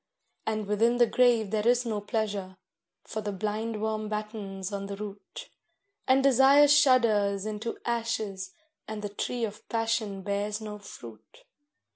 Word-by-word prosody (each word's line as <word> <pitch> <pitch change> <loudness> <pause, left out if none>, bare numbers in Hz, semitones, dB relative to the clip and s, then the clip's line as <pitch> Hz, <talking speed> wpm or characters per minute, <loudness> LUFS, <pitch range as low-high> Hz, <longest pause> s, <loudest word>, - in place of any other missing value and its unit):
And 215 -1 -1
within 225 +4 +2
the 240 - +6
grave 235 -3 +3
there 215 0 0
is 245 0 +3
no 215 -3 -2
pleasure, 205 -3 -3 0.5
for 220 - -5
the 205 0 -3
blindworm 215 +1 -2
battens 210 -2 -5
on 200 0 -4
the 200 - -5
root, 200 -1 -8 0.6
And 265 +1 +4
Desire 275 +2 +6
shudders 220 -8 +4
into 215 +2 -4
ashes, 220 -5 -2 0.4
and 215 -1 -6
the 205 - -3
tree 235 +3 -2
of 210 -1 -10
Passion 225 -4 -1
bears 205 +2 -2
no 210 -1 -7
fruit. 115 - -13
215 Hz, 140 wpm, -28 LUFS, 200-230 Hz, 0.6 s, the